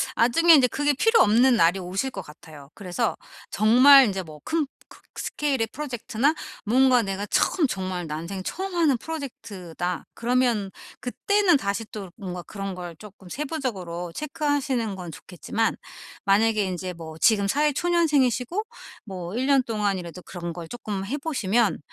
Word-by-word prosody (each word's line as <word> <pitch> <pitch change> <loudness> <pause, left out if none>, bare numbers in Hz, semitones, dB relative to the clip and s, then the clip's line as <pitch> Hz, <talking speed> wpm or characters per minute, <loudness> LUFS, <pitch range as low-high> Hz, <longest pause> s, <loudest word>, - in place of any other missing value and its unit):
나중에 330 +9 +5
이제 265 -4 +5
그게 290 +4 0
필요 450 - +4
없는 240 +4 +5
날이 185 -3 +3
오실 190 +8 -3
것 195 - -6
같아요. 150 -3 -14
그래서 205 +3 -2 0.4
정말 255 +4 +7
이제 190 -1 -3
뭐 155 -3 -12
큰 315 -2 0 0.2
크 - - -15 0.2
스케일의 270 -6 -1
프로젝트나 255 -1 -1 0.3
뭔가 250 +2 +4
내가 195 0 -3
처음 315 - +2
정말 185 -5 -4
난생 170 +5 -5
처음 380 - -4
하는 320 -7 +3
프로젝트다 200 - -6
그러면 235 -4 +1 0.3
그때는 380 +7 +2
다시 200 -1 -2
또 200 -3 -7
뭔가 180 -4 -6
그런 195 +1 -6
걸 175 -2 -7
조금 195 0 -14
세부적으로 195 - -4
체크하시는 280 - -1
건 180 -3 -7
좋겠지만 190 +8 -2 0.5
만약에 215 +2 +3
인제 185 0 -4
뭐 160 -1 -9
지금 200 -1 +4
사회 295 +7 +2
초년생이시고 300 - +1 0.4
뭐 185 -2 -6
1 260 - 0
년 275 -1 +4
동안이라도 195 -7 -3
그런 175 -2 -6
걸 170 -1 -8
쪼끔 205 -3 -5
해 260 +9 -3
보시면 240 -8 +1
220 Hz, 330 characters per minute, -25 LUFS, 185-270 Hz, 0.5 s, 정말